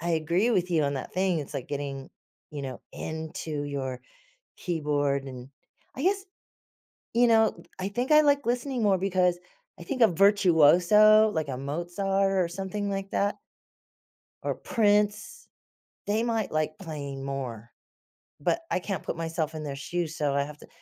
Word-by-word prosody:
I 170 +1 -2
agree 170 +7 +1
with 180 -5 +1
you 165 -3 +2
on 140 0 0
that 135 - -6
thing, 185 -2 +1
it's 145 - -6
like 130 - -5
getting, 140 -1 -4 0.4
you 145 -2 -6
know, 130 -3 -6
into 160 -1 -5
your 135 -3 -4 0.6
keyboard 145 -5 0
and 130 -1 -9 0.5
I 265 - -5
guess, 385 +1 +1 0.9
you 240 +1 +5
know, 225 -1 +3 0.2
I 190 +1 -2
think 245 +7 -3
I 300 - +8
like 285 -1 +3
listening 245 0 -1
more 195 -3 +3
because 180 -2 +1 0.4
I - - -9
think 260 -4 -2
of 220 -6 +5
Virtuoso, 200 +3 +6
like 160 -6 -2
a 130 - -3
Mozart 175 +8 -1
or 170 - -3
something 195 +3 -4
like 195 0 -4
that 205 +1 0 1.0
or - - -1
Prince, 210 -1 0 0.6
they 210 +2 +1
might 225 -3 -1
like 155 0 -1
playing 140 -6 -6
more. 125 -5 -5 0.7
But 335 - 0
I - - +2
can't 185 -3 -4
put - - -3
myself 165 -1 -2
in 155 -1 -5
their 140 -2 -4
shoes, 165 +3 -3
so 145 -2 0
I 140 0 +2
have 150 +1 -9
to - - -15
175 Hz, 165 wpm, -27 LUFS, 145-205 Hz, 1.0 s, I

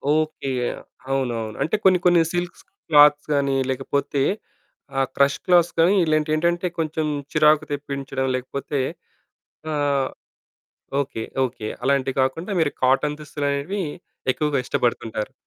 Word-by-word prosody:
Okay. 155 -3 -1 0.6
అవునవును. 120 -5 -2
అంటే 160 - 0
కొన్ని 185 -1 +5
కొన్ని 175 -1 +6
సిల్క్స్ 175 0 -3 0.3
క్లాత్స్ 150 -1 +6
గాని, 140 -1 +1
లేకపోతే 135 +1 -1 0.8
ఆ - - +4 0.2
క్రష్ 140 0 +3
క్లాత్స్ 175 -2 +4
గాని 175 +5 +5
ఇలాంటివి 155 0 +1
ఏంటంటే 170 +3 +1
కొంచెం 155 0 -1 0.3
చిరాకు 155 0 +4
తెప్పించడం 140 -2 -3
లేకపోతే 135 +2 -3 0.9
ఆహ్ 140 -2 +1 0.9
ఓకే. 115 -4 -5 0.2
ఓకే. 115 -3 -6 0.2
అలాంటివి 135 -1 +1
కాకుండా 160 +10 -1
మీరు 145 - +1
కాటన్ 145 +3 +2
దుస్తులనేవి 145 +5 -2 0.5
ఎక్కువగా 150 +1 0
ఇష్టపడుతుంటారు. 120 -5 -1
145 Hz, 110 wpm, -23 LUFS, 135-155 Hz, 0.9 s, కొన్ని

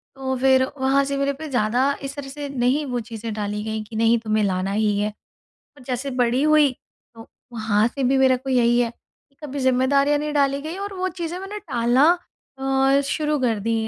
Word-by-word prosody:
तो 265 -1 -3
फिर 260 0 +4 0.2
वहाँ 270 +1 +3
से 280 0 -2
मेरे 275 0 0
पे 315 - -5
ज़्यादा 245 -1 +1 0.2
इस 275 0 -5
तरह 285 -2 -7
से 290 +1 -6
नहीं 270 +3 0
वो 245 - -1
चीज़ें 225 -1 -6
डाली 210 0 -3
गईं 220 0 -3
कि, 215 +1 -11
"नहीं, 230 +1 +3
तुम्हें 215 -1 0
लाना 190 -1 -1
ही 210 0 +1
है"। 210 +1 0 0.7
और 280 - -15
जैसे 260 +2 -3
बड़ी 245 +2 +2
हुई, 305 -1 +5 0.4
तो 225 0 -12 0.3
वहाँ 220 -2 +1
से 275 +3 -5
भी 265 +2 +3
मेरे 260 -1 +4
को 260 +2 -6
यही 240 -1 +3
है 235 -1 +1
कि 275 +4 -32
कभी 285 -1 -5
ज़िम्मेदारियाँ 275 +2 +2
नहीं 300 0 -3
डाली 280 -1 +1
गईं, 315 +5 -6
और 400 0 -5
वो 370 0 -2
चीज़ें 345 -1 -5
मैंने 390 +2 -6
टालना 255 - +2 0.5
अ-शुरू 275 +3 +1
कर 235 -4 +1
दी 230 +3 -1
265 Hz, 205 wpm, -22 LUFS, 230-280 Hz, 0.7 s, हुई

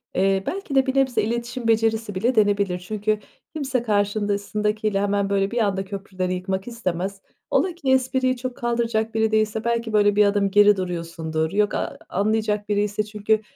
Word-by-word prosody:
eee, 195 +1 +2
belki 375 -7 -4
de 265 -1 +5
bir 265 -1 -1
nebze 260 -5 +2
iletişim 235 +2 -3
becerisi 225 -2 +1
bile 235 +7 +1
denebilir. 200 -4 +2
Çünkü 215 +3 -1 0.3
kimse 270 -6 -1
karşısındakiyle 210 0 0
hemen 200 0 0
böyle 195 0 +1
bir 240 - -3
anda 195 -3 0
köprüleri 190 -2 -4
yıkmak 190 +2 -3
istemez, 195 -4 -3 0.3
ola 365 -3 +1
ki 280 -6 -1
espriyi 260 0 +2
çok 250 0 -5
kaldıracak 235 -2 -1
biri 220 0 +2
değilse 215 0 +1
belki 235 -1 -1
böyle 205 -1 +4
bir 210 0 +5
adım 200 -1 +1
geri 205 0 +6
duruyorsundur. 165 -3 -3
Yok, 205 +1 +1
a - - -3
anlayacak 210 +1 0
biriyse. 205 0 0
Çünkü 210 +1 0
210 Hz, 165 wpm, -23 LUFS, 200-230 Hz, 0.3 s, geri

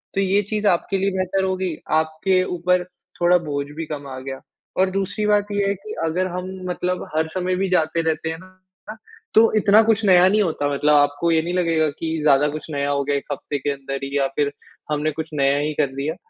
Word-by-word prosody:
तो 195 - +2
ये 195 +1 +2
चीज़ 215 -1 0
आपके 195 +1 +1
लिए 195 +1 0
बेहतर 185 +1 0
होगी, 185 -3 -1 0.2
आपके 160 +4 +2
ऊपर 180 0 0 0.4
थोड़ा 175 +1 +5
बोझ 140 0 -2
भी 165 - -3
कम 145 -2 -6
आ 130 -1 -7
गया। 135 0 -6 0.4
और 190 0 +3
दूसरी 195 +2 -2
बात 205 -1 +2
ये 200 -1 +1
है 200 - +2
कि 205 +3 -9
अगर 180 +3 0
हम, 180 +1 -5 0.2
मतलब 180 0 -2
हर 160 0 +1
समय 185 0 0
भी 195 - 0
जाते 165 -2 +1
रहते 160 0 -1
हैं 160 - -4
ना, 185 +3 -14 0.4
तो 225 +1 +6
इतना 210 +1 +6
कुछ 225 -1 +2
नया 185 -2 +6
नहीं 210 +3 +3
होता 150 -4 -1
मतलब, 150 +2 +2
आपको 145 +3 +3
ये 160 - +3
नहीं 175 - -3
लगेगा 165 -3 +2
कि 160 -1 -2
ज़्यादा 145 0 +4
कुछ 155 - -11
नया 140 0 -1
हो 140 0 0
गया, 140 +1 0
1 - - -6
हफ्ते 145 +1 -4
के 145 +2 -1
अंदर 135 0 -5
ही 140 +1 -2
या 135 -1 +2
फिर 145 -1 +1 0.4
हमने 150 +1 0
कुछ 160 +1 -5
नया 140 -1 +2
ही 150 +1 -1
कर 140 - +2
दिया। 145 +4 -2
170 Hz, 225 wpm, -22 LUFS, 145-185 Hz, 0.4 s, तो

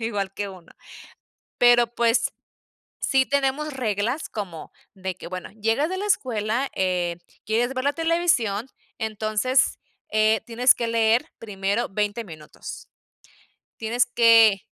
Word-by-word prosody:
igual 205 -4 -2
que 205 -1 -3
uno. 185 -3 -13 0.9
Pero, 240 -1 +6
pues, 235 +1 +2 0.7
sí 265 -1 +2
tenemos 280 +2 0
reglas, 235 +3 -2
como 180 -7 -7 0.2
de 190 -1 -4
que, - - -10
bueno, 185 0 -6
llegas 225 +9 +1
de 375 - -3
la 410 - -3
escuela, 240 - 0
eh, 180 -2 0 0.3
quieres 235 +5 0
ver 255 0 -3
la 285 - +2
televisión. 325 - +1 0.3
Entonces, 220 +4 +1 0.3
eh, 215 0 +3
tienes 245 +2 +4
que 235 - -2
leer, 230 +5 +2
primero, 200 +1 -2
20 210 +3 -2
minutos, 155 -5 -10 0.9
tienes 230 +2 +1
que 230 -4 +5
225 Hz, 125 wpm, -24 LUFS, 205-255 Hz, 0.9 s, Pero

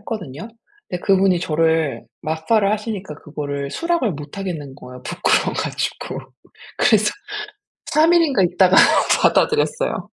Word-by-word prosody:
했거든요. 205 - -7 0.4
근데 180 - -4
그분이 190 -2 +3
저를 160 -6 0 0.2
맞팔을 180 +7 +1
하시니까 210 -5 -4
그거를 145 -2 -5
수락을 335 - 0
못 145 +4 -9
하겠는 160 -8 -5
거예요, 125 -2 -12
부끄러워 - - +1
가지고. - - -3 0.6
그래서 210 -1 +4 0.8
3 320 +3 +3
일인가 305 - +3
있다가 180 +1 +3 0.5
받아들였어요. 465 +2 +1
185 Hz, 315 characters per minute, -20 LUFS, 150-215 Hz, 0.8 s, 그래서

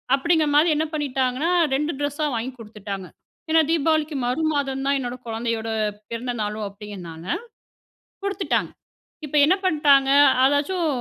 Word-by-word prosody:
அப்டிங்கிறமாரி 310 +1 +3
என்ன 315 +1 0
பண்ணிட்டாங்கன்னா, 275 +2 0 0.2
2 295 +4 0
ட்ரெஸ்ஸா 290 +1 -1
வாங்கி 240 +4 -3
குடுத்துட்டாங்க. 205 -4 -7 0.4
ஏன்னா 320 0 +6
தீபாவளிக்கு 315 -1 +1
மறுமாதம் 275 -1 -1
தான் 280 0 +2
என்னோட 245 -1 -4
குழந்தையோட 225 0 -2 0.4
பிறந்த 240 +2 -3
நாளும் 210 0 -3
அப்பிடிங்கிறனால 190 -4 -7 0.9
குடுத்துட்டாங்க. 400 0 -1 0.6
இப்ப 300 - -3
என்ன 350 +5 +4
பண்ட்டாங்க. 285 -5 +4 0.3
அ - - +5
ஏதாச்சும் 320 +5 0
275 Hz, 120 wpm, -23 LUFS, 225-305 Hz, 0.9 s, ஏன்னா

